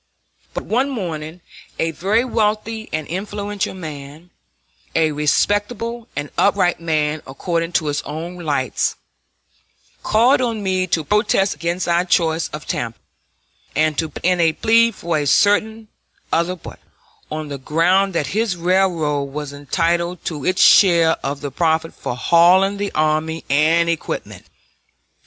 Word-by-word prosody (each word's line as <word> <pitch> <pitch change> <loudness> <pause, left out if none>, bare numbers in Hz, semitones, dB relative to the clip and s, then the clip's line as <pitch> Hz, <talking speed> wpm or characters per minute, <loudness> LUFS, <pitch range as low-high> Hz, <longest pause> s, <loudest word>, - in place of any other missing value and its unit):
But - - -4
one 255 +5 +1
morning 170 - -5 0.4
a 165 - 0
very 205 +9 +1
wealthy 220 -1 -1
and 155 -1 -2
influential 205 +2 -4
man, 155 0 -9 0.6
a 160 -1 +3
respectable 205 +10 0
and 145 0 -4
upright 195 -4 +2
man 155 -2 -1
according 165 +5 -3
to 160 - +1
his 145 -1 -1
own 165 +4 -7
lights, 145 -6 -1 1.1
called 245 +5 +3
on 230 -4 -2
me 185 -1 0
to 165 -2 0
protest 195 +2 +2
against 170 +4 -3
our 170 +1 +2
choice 165 -2 +1
of 150 0 -8
Tampa, 115 -1 -3 0.8
and 155 0 +2
to 160 - -1
put - - -9
in 180 -1 +3
a 165 -2 +3
plea 230 +6 +4
for 170 -7 -2
a 145 - -2
certain 215 +6 +2 0.5
other 170 +2 +1
port, 175 - -11 0.5
on 155 -1 -4
the 140 -1 -5
ground 180 +7 +2
that 150 - +1
his 215 -3 0
railroad 170 -5 +1
was 145 +1 -6
entitled 170 +4 -1
to 150 -5 -4
its 185 +4 +2
share 170 -4 +6
of 140 +1 -3
the 145 -1 -5
profit 160 +2 0
for 120 - -5
hauling 180 +7 +4
the 200 0 -3
army 155 +1 0
and 160 +4 +3
equipment! 165 -2 -4
170 Hz, 140 wpm, -20 LUFS, 155-195 Hz, 1.1 s, share